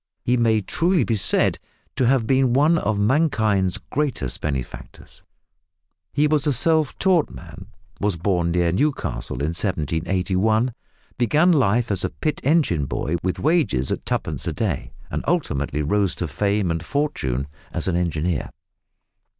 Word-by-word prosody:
He 125 - +2
may 115 -3 +2
truly 170 - +1
be 115 +1 0
said 100 - +2 0.4
to 125 - +2
have 130 -3 +3
been 130 0 +2
one 155 +5 +4
of 105 0 -1
mankind's 110 - +2
greatest 135 - -2
benefactors. 70 -5 -6 0.9
He 145 +1 +2
was 150 -1 +1
a 145 - +3
self 155 +3 +2
taught 185 -5 +2
man, - - -11 0.3
was 100 -2 0
born 85 0 0
near 85 0 +1
Newcastle 85 - -2
in 75 - 0
1781, 95 - 0 0.5
began 150 - +4
life 120 - +2
as 100 0 +1
a - - 0
pit 155 -2 -3
engine 135 - +2
boy 85 +5 -2
with 90 0 -2
wages 145 - +1
at - - -2
two - - 0
pence - - -5
a - - -1
day, - - -2 0.2
and - - -3
ultimately 75 - -1
rose 100 +5 +1
to 85 - -3
fame 100 +4 0
and 80 0 -3
fortune 85 - -1 0.3
as - - -2
an 90 - +1
engineer. 85 -3 -1
105 Hz, 150 wpm, -22 LUFS, 85-140 Hz, 0.9 s, one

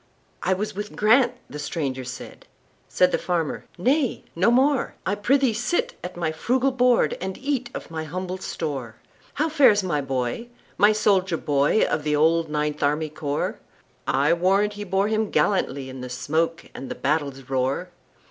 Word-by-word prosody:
"I 190 - +2
was 210 +2 -3
with 210 +1 -6
Grant"—the 240 - +2
stranger 140 -4 -3
said; 125 0 -9 0.4
Said 180 0 +3
the - - +1
farmer, 170 -4 -2
"Nay, 260 - +1
no 180 +6 +3
more,—I 260 -4 +1
prithee 255 +4 +2
sit 240 +10 -1
at 180 0 -6
my 165 -2 -1
frugal 255 +11 +1
board, 250 -1 +3
And 190 0 -4
eat 270 -3 -2
of - - -7
my 160 -1 -4
humble 185 +3 -4
store."How 145 - -5
fares 270 -10 +5
my 150 -6 0
boy,—my 140 - 0
soldier 195 -5 +2
boy, 145 +8 +2
Of 155 - 0
the 150 0 +1
old 160 +2 +3
Ninth 150 0 -2
Army 150 +2 +1
Corps?I 145 -1 -2
warrant 195 +4 +2
he 205 0 -6
bore 195 +1 +1
him 220 0 0
gallantlyIn 135 -9 0
the 125 - -6
smoke 160 +6 -1
and 135 - -7
the - - -4
battle's 140 -3 -1
roar!" 135 +7 -1
180 Hz, 150 wpm, -24 LUFS, 150-215 Hz, 0.4 s, fares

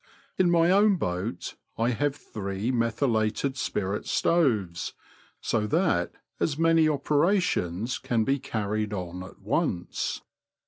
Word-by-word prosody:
In 185 -2 +3
my 170 0 +4
own 200 +1 +5
boat 90 - -3 0.2
I 115 +2 +2
have 145 +4 0
three 100 -2 -4
methylated 115 +1 0
spirit 100 -5 -2
stoves, 110 - +1 0.5
so 110 -2 0
that 155 - +1 0.3
as 145 -3 0
many 165 -1 +4
operations 145 - +1
can 115 -2 0
be 135 +4 +1
carried 105 -2 -2
on 90 -2 -5
at 95 - -11
once. 85 0 -1
115 Hz, 120 wpm, -27 LUFS, 100-155 Hz, 0.5 s, own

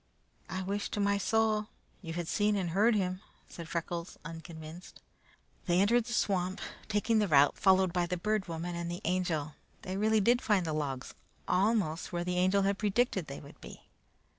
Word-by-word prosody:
"I 185 - -3
wish 200 +2 -2
to - - -3
my 200 0 +2
soul 215 0 +1 0.3
you 165 -4 -6
had 170 -1 -3
seen 210 +2 +2
and 185 -4 -1
heard 215 +6 +4
him!" 185 -2 -1 0.3
said 165 -1 -9
Freckles, 170 0 -4
unconvinced. 165 +1 -9 0.7
They 175 0 +3
entered 225 +4 +3
the 240 - -5
swamp, 190 -3 0 0.3
taking 220 +1 +2
the 210 - +2
route 145 -3 +5
followed 190 -2 +4
by 175 -1 +1
the 180 +1 -2
Bird 210 +2 -1
Woman 170 +1 -4
and 170 0 -3
the 175 +1 -5
Angel. 170 -4 -1 0.3
They 185 +1 -4
really 215 +1 +3
did 240 +5 +3
find 200 -5 +2
the 160 - -2
logs, 140 -4 -3 0.3
almost 190 -5 +1
where 175 0 -2
the 180 0 -1
Angel 190 +2 +3
had 195 0 0
predicted 205 -4 +1
they 140 - -7
would 140 - -14
be. - - -11
185 Hz, 185 wpm, -31 LUFS, 170-205 Hz, 0.7 s, route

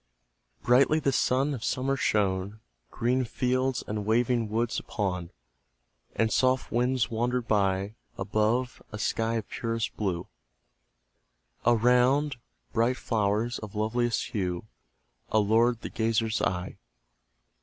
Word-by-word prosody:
Brightly 135 +5 +4
the 140 -2 +1
sun 135 +3 +1
of 120 -4 -5
summer 135 +2 0
shone 100 -3 0 0.3
Green 125 +2 0
fields 130 +2 0
and 105 0 -3
waving 115 +1 +1
woods 115 +2 0
upon, 90 -5 -3 0.9
And 115 -1 +1
soft 130 -1 +2
winds 125 +1 +1
wandered 120 +1 -1
by; 100 -1 +1 0.2
Above, 110 +4 0
a 105 - -5
sky 115 +1 0
of 110 -2 -3
purest 115 -1 -3
blue, 95 -5 -2 1.4
Around, 125 +4 +3 0.4
bright 120 +3 +2
flowers 110 +2 0
of 105 -2 -9
loveliest 115 +2 0
hue, 90 -2 -2 0.6
Allured 110 +2 +3
the - - -5
gazer's 115 0 0
eye. 90 0 -2
115 Hz, 110 wpm, -28 LUFS, 105-125 Hz, 1.4 s, Brightly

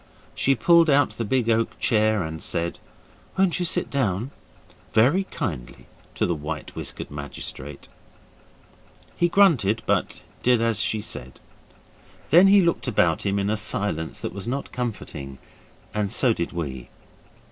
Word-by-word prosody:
She 135 - +2
pulled 170 +4 +5
out 140 -4 +4
the 115 +2 -4
big 120 +1 0
oak 115 0 +1
chair 110 -3 +2
and 80 0 -6
said, 85 0 -2 0.6
'Won't 190 -2 +2
you 180 - 0
sit - - -2
down?' 120 -2 -1 0.6
very 135 - +4
kindly 85 - -5 0.3
to - - +1
the 85 - 0
white 75 0 -6
whiskered - - -6
magistrate. 70 -1 -8 1.3
He 175 - +2
grunted, 125 - +3
but - - -1 0.2
did 125 -1 +3
as 115 -2 +1
she 110 +1 -1
said. 65 -9 -7 0.9
Then 175 +5 +8
he 195 -1 +6
looked 170 -5 0
about 90 -6 +2
him 100 0 +1
in 100 +1 0
a - - +1
silence 95 -6 -2
that - - -4
was 100 +1 -4
not 140 +3 -3
comforting, 80 - -5 0.6
and 105 -2 -1
so 125 -4 +3
did 85 -5 -3
we. 70 -8 -5
110 Hz, 145 wpm, -24 LUFS, 85-135 Hz, 1.3 s, Then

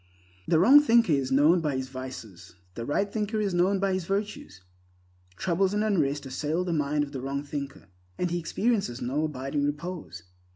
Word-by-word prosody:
The 165 - +3
wrong 250 - +8
thinker 230 - +4
is 135 -2 0
known 150 +6 +5
by 150 -4 -1
his 130 0 -4
vices; 115 -9 -9 0.2
the 115 +3 -6
right 200 +7 +1
thinker 215 0 -1
is 200 -3 -1
know 185 +3 +2
by 195 0 0
his 185 -2 -2
virtues. 195 - -4 0.7
Troubles 190 - 0
and 210 - +1
unrest 150 -9 0
assail 150 +6 -2
the 180 -2 -2
mind 145 -1 0
of 140 - -7
the 135 -3 -5
wrong 140 +2 -3
thinker, 140 -1 -6 0.3
and 180 -1 -1
he 175 - 0
experiences 195 - -1
no 140 +6 -1
abiding 140 0 -3
repose. 145 - -4
150 Hz, 180 wpm, -27 LUFS, 135-190 Hz, 0.7 s, wrong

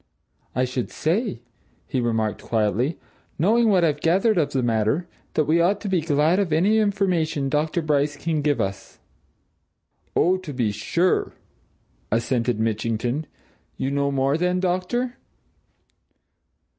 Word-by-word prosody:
"I 130 +1 +2
should 125 -1 -3
say," 180 - -1 0.4
he 130 - -1
remarked 110 -3 -1
quietly, 115 +7 0 0.4
"knowing 225 +7 +3
what 185 -4 +4
I've 150 -2 +1
gathered 190 +4 +3
of 150 - 0
the 130 -2 0
matter, 115 +8 +1 0.3
that 155 - +2
we 160 +3 +3
ought 195 +4 +2
to 210 - -5
be 185 -3 +2
glad 155 +4 +2
of 195 -5 0
any 195 +8 +3
information 180 -9 0
Dr. 155 +3 0
Bryce 145 -1 +1
can 160 0 -1
give 145 -1 +1
us." 95 0 -4 1.2
"Oh, 185 +2 +3
to 185 -6 -8
be 120 -5 0
sure!" 175 - 0 0.8
assented 115 0 0
Mitchington. 115 +6 -1 0.5
"You 135 - -2
know 140 0 +1
more, 140 +2 +1
then, 180 +1 +1
doctor?" 185 +8 -1
150 Hz, 135 wpm, -23 LUFS, 125-180 Hz, 1.2 s, what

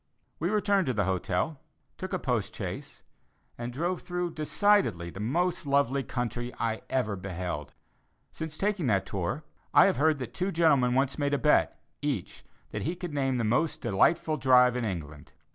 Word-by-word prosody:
We 170 - 0
returned 200 -4 +2
to 130 - 0
the 105 - +2
hotel, 95 - -1 0.4
took - - -5
a - - 0
post - - -2
chaise, - - -6 0.5
and 120 +1 -5
drove 170 +8 -2
through 180 -2 -3
decidedly 155 - +2
the 95 - -9
most 165 - 0
lovely 140 -1 +2
country 120 -1 -3
I 110 -1 -1
ever 110 -6 0
beheld. 90 -6 -5 0.6
Since 160 -1 -6
taking 200 -7 0
that 100 -4 +2
tour, 100 - -3 0.3
I - - +9
have 195 - +2
heard 155 +1 +3
that 130 -3 -6
two 185 +2 -1
gentlemen 140 -8 +3
once 135 +2 +1
made 145 0 +1
a - - +1
bet, 125 - +3 0.2
each, - - -3 0.3
that - - -3
he 170 +4 -2
could 175 -3 -6
name 135 -3 0
the 120 - 0
most 125 +9 +1
delightful 155 - +2
drive 125 -2 +5
in 125 -2 -1
England. 75 -7 -6
130 Hz, 175 wpm, -28 LUFS, 110-165 Hz, 0.6 s, I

